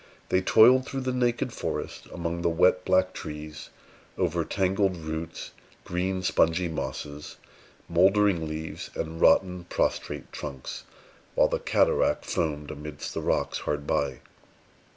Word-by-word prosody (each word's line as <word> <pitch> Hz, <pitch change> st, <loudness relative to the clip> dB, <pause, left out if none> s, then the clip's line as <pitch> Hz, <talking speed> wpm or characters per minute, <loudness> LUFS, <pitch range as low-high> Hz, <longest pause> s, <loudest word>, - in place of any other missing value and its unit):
They 95 Hz, -, +3 dB
toiled 125 Hz, +7 st, +6 dB
through 135 Hz, -1 st, -3 dB
the 130 Hz, 0 st, -1 dB
naked 120 Hz, -1 st, 0 dB
forest, -, -, -4 dB
among 85 Hz, 0 st, -3 dB
the 85 Hz, -, +2 dB
wet, 90 Hz, +2 st, +3 dB
black 95 Hz, 0 st, +3 dB
trees, 75 Hz, 0 st, -7 dB, 0.5 s
over -, -, +1 dB
tangled 95 Hz, -1 st, +1 dB
roots, 80 Hz, 0 st, -5 dB, 0.3 s
green, 95 Hz, +1 st, -2 dB
spongy 85 Hz, 0 st, +2 dB
mosses, 75 Hz, -2 st, -5 dB, 0.5 s
mouldering 95 Hz, 0 st, +3 dB
leaves, 80 Hz, +1 st, -5 dB
and 80 Hz, 0 st, -4 dB
rotten, 90 Hz, -2 st, +4 dB
prostrate -, -, -2 dB
trunks, 70 Hz, -3 st, -6 dB, 0.5 s
while -, -, +4 dB
the -, -, -1 dB
cataract -, -, +2 dB
foamed 75 Hz, -3 st, -2 dB
amidst 75 Hz, 0 st, -7 dB
the -, -, -3 dB
rocks -, -, 0 dB
hard 75 Hz, -1 st, -3 dB
by. 70 Hz, -, -1 dB
85 Hz, 130 wpm, -27 LUFS, 80-95 Hz, 0.5 s, toiled